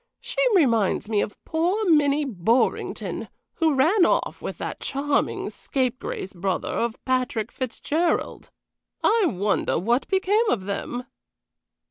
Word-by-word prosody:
She - - -9 0.2
reminds 230 - +2
me 210 -2 +2
of 210 - -4
poor 360 +6 0
Minnie 295 -2 +4
Borringdon, 230 +1 0 0.3
who 320 -3 +2
ran 335 +9 +4
off - - +1
with - - -5
that - - -5
charming 280 +1 -1
scapegrace 255 -7 -3
brother 185 +1 -2
of 235 -1 -1
Patrick 250 -4 0
Fitzgerald. 290 +6 -2 0.5
I 450 -3 +4
wonder 200 - 0
what 235 +9 +1
became 410 +4 +2
of 195 - 0
them?" 205 +5 -4
260 Hz, 120 wpm, -24 LUFS, 220-325 Hz, 0.5 s, Minnie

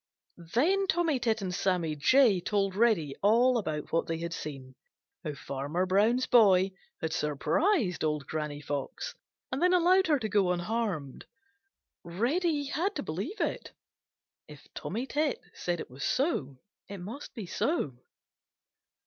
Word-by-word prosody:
Then 385 +10 +3
Tommy 330 -6 +1
Tit 225 -3 0
and 185 -1 -3
Sammy 175 -4 0
Jay 215 - +4
told 195 0 0
Reddy 200 -11 +2
all 235 +4 +4
about 155 -7 -4
what 165 - +1
they 165 - -2
had 170 +1 -4
seen, 135 -5 -7 0.5
how 150 -3 -4
Farmer 140 +6 -2
Brown's 215 +7 +3
boy 195 -5 +5 0.3
had 160 0 -2
surprised 180 - +1
Old 150 -2 -1
Granny 150 -2 -4
Fox 145 -1 -4 0.4
and 260 - -2
then 360 +1 +4
allowed 365 +2 +4
her 300 -2 +4
to 225 -5 -3
go 195 -3 +2
unharmed. 180 - -3 0.8
Reddy 285 - 0
had 355 +8 -1
to - - -3
believe 200 - -4
it. - - -2 0.7
If - - -14
Tommy 240 +4 -4
Tit 290 0 0
said 175 -1 -2
it - - -7
was 130 +2 -7
so, 255 - 0 0.3
it 200 - -7
must 215 +13 -8
be 220 -5 -5
so. 170 - -1
195 Hz, 145 wpm, -29 LUFS, 160-265 Hz, 0.8 s, boy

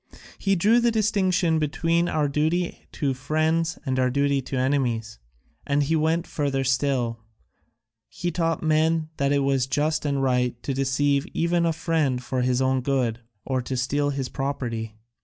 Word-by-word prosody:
He 195 0 +2
drew 215 +7 +4
the 240 0 +3
distinction 190 -7 +1
between 165 +3 +1
our 150 -2 +1
duty 160 +5 -1
to 140 -4 -1
friends 160 +5 0
and 130 -1 0
our 130 0 +3
duty 140 +1 +1
to 130 +1 -5
enemies; 125 -5 -1 0.4
and 145 +1 +1
he 160 +3 +1
went 160 +2 +1
further 140 -3 -1
still; 130 -3 0 0.9
he 175 0 -3
taught 165 -1 -1
men 160 0 +2
that 140 0 +1
it 140 -1 +2
was 135 -2 +1
just 150 +3 0
and 140 -2 0
right 125 -2 +1
to 140 - -2
deceive 140 +3 +1
even 170 0 +2
a - - +2
friend 155 -5 0
for 130 0 -2
his 125 +1 +1
own 130 0 +1
good, 125 -4 0 0.3
or 130 -2 -1
steal 145 +3 0
his 135 -2 -2
property. 120 -6 -4
140 Hz, 160 wpm, -24 LUFS, 130-160 Hz, 0.9 s, drew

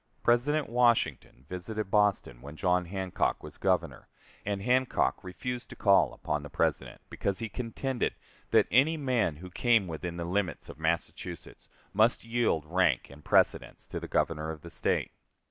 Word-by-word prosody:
President 140 +5 +2
Washington 120 - +1
visited 95 +4 -5
Boston 100 - +2
when 70 +2 -9
John 90 +1 +1
Hancock 95 0 -1
was - - -10
Governor, - - 0 0.4
and 100 -1 -2
Hancock 125 +2 +1
refused 120 +7 -5
to - - -9
call 100 -2 +4
upon 75 0 -3
the 75 - -9
President, - - -1
because 100 -1 -1
he 115 -1 -3
contended 125 +2 -2 0.3
that - - +5
any 145 +7 +4
man 125 - +1
who 90 +4 -10
came 115 0 +3
within 85 +1 -5
the 85 - -3
limits 90 -1 -2
of - - -10
Massachusetts 80 +1 -4 0.2
must 110 +4 +3
yield 115 -9 0
rank 85 -6 +1
and 75 +1 -14
precedence - - +2
to - - -4
the - - -7
Governor 80 -1 0
of 80 -2 -6
the 85 - -10
State. - - 0
95 Hz, 160 wpm, -29 LUFS, 85-120 Hz, 0.4 s, that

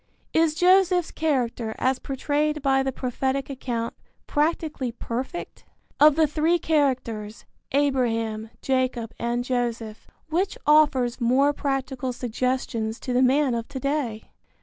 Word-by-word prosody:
Is 320 -1 +3
Joseph's 360 0 +4
character 245 -7 -1
as 260 0 +1
portrayed 295 +2 -1
by 270 -1 +3
the 265 0 -1
prophetic 265 +2 -2
account 240 -3 -3 0.3
practically 300 -4 -1
perfect? 250 +8 -5 0.4
Of 300 0 +7
the 320 0 +4
three 310 +3 +2
characters, 255 -10 -1 0.3
Abraham, 230 -6 0
Jacob 255 -4 0
and 240 +1 -1
Joseph, 235 -3 -3 0.2
which 355 +5 -1
offers 275 -5 +3
more 265 +5 +3
practical 270 -2 -2
suggestions 240 -2 -2
to 250 - -3
the 250 - +3
man 265 +1 +3
of 230 -1 -3
to 280 -2 -6
day? 270 -5 -2
265 Hz, 125 wpm, -25 LUFS, 240-295 Hz, 0.4 s, Of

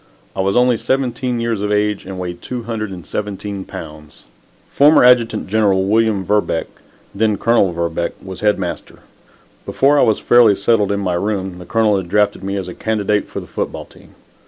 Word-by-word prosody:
I 95 - -1
was 100 +1 0
only 125 -1 +3
seventeen 125 -1 -1
years 115 -3 -2
of 105 0 -2
age 105 -1 0
and 95 -1 -6
weighed 90 -1 -6
217 105 -4 -5
pounds. 75 -1 -10 0.5
Former 145 0 +5
Adjutant 120 -3 +4
General 100 -2 +2
William 110 -2 +1
Verbeck 105 -4 0 0.5
then 105 0 +1
Colonel 115 -5 +2
Verbeck 85 0 -2
was 95 -1 -9
Head 105 -1 +2
Master. 90 -3 -6 0.6
Before 145 +2 +2
I - - +5
was 110 - +3
fairly 120 -4 +5
settled 105 0 +1
in 100 - -1
my 90 -2 -1
room, 95 0 -3
the 90 - -10
Colonel 110 -3 +2
had 95 -2 -5
drafted 105 0 +1
me 100 +1 -3
as 95 -2 -4
a 90 - -7
candidate 105 -1 -1
for - - -6
the - - -9
football - - -5
team. - - -20
105 Hz, 175 wpm, -18 LUFS, 95-115 Hz, 0.6 s, Former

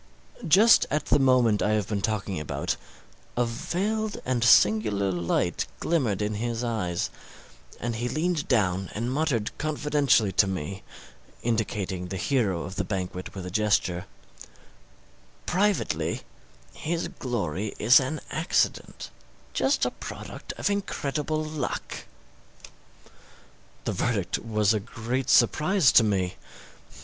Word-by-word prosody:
Just 210 +8 +6
at 150 +2 -1
the 145 - +3
moment 125 -5 +4
I 105 - +2
have 105 -3 0
been 105 -2 -2
talking 100 -4 -2
about, 75 - -2 0.6
a 120 - +3
veiled 205 - -2
and 125 -2 0
singular 105 -3 +4
light 85 -2 -1
glimmered 120 - 0
in 105 +1 -1
his 120 0 -2
eyes, 105 -8 -2 0.7
and 120 -1 -3
he 120 +2 -2
leaned 160 +1 -1
down 95 -6 +1
and 120 +4 -2
muttered 135 -8 0
confidentially 150 -7 +2
to 95 +2 +3
me 95 0 -4 0.6
indicating 105 -5 -2
the 95 - -4
hero 100 -9 0
of 95 +2 -7
the 105 - +1
banquet 90 -1 -4
with 95 -2 -6
a 90 - -6
gesture, 100 -4 +1 1.4
'Privately 200 +2 0 0.5
his 170 +2 -2
glory 105 - -3
is 120 +5 +7
an 140 +3 -3
accident 160 +3 -1 0.4
just - - +2
a - - 0
product - - -8
of 205 - -1
incredible 155 -6 -2
luck.' 155 -4 -4 1.8
This - - -1
verdict 105 -7 0
was 110 -2 +1
a 110 - +1
great 120 +4 -3
surprise 155 - +4
to 115 - +7
me. 95 -4 0
115 Hz, 125 wpm, -26 LUFS, 100-145 Hz, 1.8 s, is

